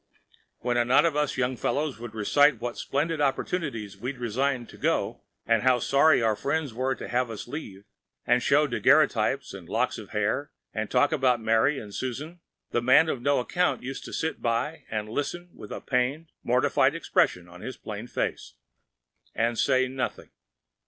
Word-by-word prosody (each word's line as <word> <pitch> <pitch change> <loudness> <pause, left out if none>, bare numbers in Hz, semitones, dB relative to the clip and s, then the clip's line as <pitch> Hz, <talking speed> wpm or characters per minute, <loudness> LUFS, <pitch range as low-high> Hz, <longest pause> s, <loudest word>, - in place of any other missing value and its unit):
When 120 0 0
a 120 - +4
knot 130 +6 +5
of 165 -3 +1
us 150 -2 0
young 130 0 0
fellows 145 0 -1
would 120 -2 -8
recite 145 +5 +4
what 120 0 -4
splendid 155 +2 -1
opportunities 135 - -2
we 125 +7 -4
resigned 125 +1 -1
to - - -13
go, - - 0 0.2
and 115 -1 +3
how 130 0 +4
sorry 140 +2 +4
our 110 -1 +2
friends 145 +1 -2
were 130 +3 -1
to - - -7
have 125 0 0
us 110 0 -7
leave, 105 -8 -7 0.4
and 125 - +3
show 140 +5 +4
daguerreotypes 120 - +2
and - - -10
locks - - 0
of - - -10
hair, 105 +7 -1 0.2
and 110 -1 -3
talk 130 +3 +3
of 130 -4 +2
Mary 115 +6 +2
and 105 -5 -8
Susan, 145 - -5 0.3
the 120 - +1
man 130 +6 +5
of 130 - -2
no 140 +1 +2
account 180 +7 0
used 135 +2 -5
to - - -8
sit 160 - -3
by 120 +7 -1
and 105 -1 -3
listen 175 +9 -4
with - - -11
a - - -5
pained, 135 +5 -1
mortified 135 +3 +2
expression 90 - +1
on 90 +1 -13
his 130 - -6
plain 105 +2 -7
face, - - -3 0.8
and 115 +1 0
say 130 0 +3
nothing. 130 0 -4
130 Hz, 180 wpm, -27 LUFS, 115-145 Hz, 0.8 s, knot